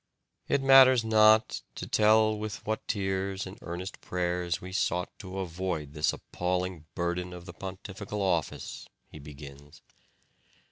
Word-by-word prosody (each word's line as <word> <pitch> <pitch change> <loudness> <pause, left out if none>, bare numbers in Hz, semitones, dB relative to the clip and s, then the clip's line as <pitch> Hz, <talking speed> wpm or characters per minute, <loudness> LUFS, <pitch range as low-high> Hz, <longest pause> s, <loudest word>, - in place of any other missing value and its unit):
"It 140 - +1
matters 130 -3 +7
not 110 0 +5
to - - -5
tell 110 0 +4
with 105 0 -6
what 110 +1 -3
tears 95 -1 -1
and 95 +4 -10
earnest 90 +3 -6
prayers 90 -1 -1
we 95 - -9
sought 90 -1 0
to 95 -2 -7
avoid 85 -5 -3
this 75 0 +1
appalling 90 -2 -3
burden 90 +1 -2
of 90 -1 -10
the 85 - -9
pontifical 100 +2 -6
office," 85 -5 -2 0.2
he 75 - -10
begins. 70 +1 -12
95 Hz, 135 wpm, -29 LUFS, 85-105 Hz, 0.2 s, matters